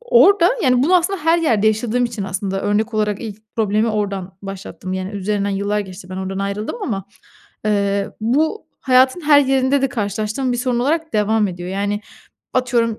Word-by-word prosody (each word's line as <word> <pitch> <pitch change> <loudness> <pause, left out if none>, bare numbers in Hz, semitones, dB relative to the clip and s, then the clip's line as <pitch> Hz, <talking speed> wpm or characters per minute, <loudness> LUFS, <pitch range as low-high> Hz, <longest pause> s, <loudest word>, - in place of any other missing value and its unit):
orada, 410 -7 +5
yani, 255 -3 +3
bunu 355 +6 +5
aslında 360 +3 0
her 330 +1 +4
yerde 225 -11 +2
yaşadığım 220 +3 +1
için 235 -3 -3
aslında 195 0 -3
örnek 215 +3 0
olarak 210 -1 0
ilk 215 -2 -7
problemi 215 +1 +1
oradan 200 -4 -3
başlattım, 195 -1 -7
yani, 185 0 -3
üzerinden 205 0 -1
yıllar 200 +1 0
geçti, 185 -2 -9
ben 185 - -5
oradan 190 0 -4
ayrıldım 200 - -3
ama, 195 - -2 0.6
eee, 200 -1 0
bu 300 - 0
hayatın 260 +4 +4
her 295 -2 +6
yerinde 270 0 +2
de 270 - +2
karşılaştığım 215 +3 -2
bir 245 - -1
sorun 245 0 0
olarak 320 +5 0
devam 215 0 +2
ediyor. 175 -1 -6
Yani, 200 +2 -1 0.5
atıyorum, 235 -3 +1
215 Hz, 170 wpm, -19 LUFS, 200-260 Hz, 0.6 s, her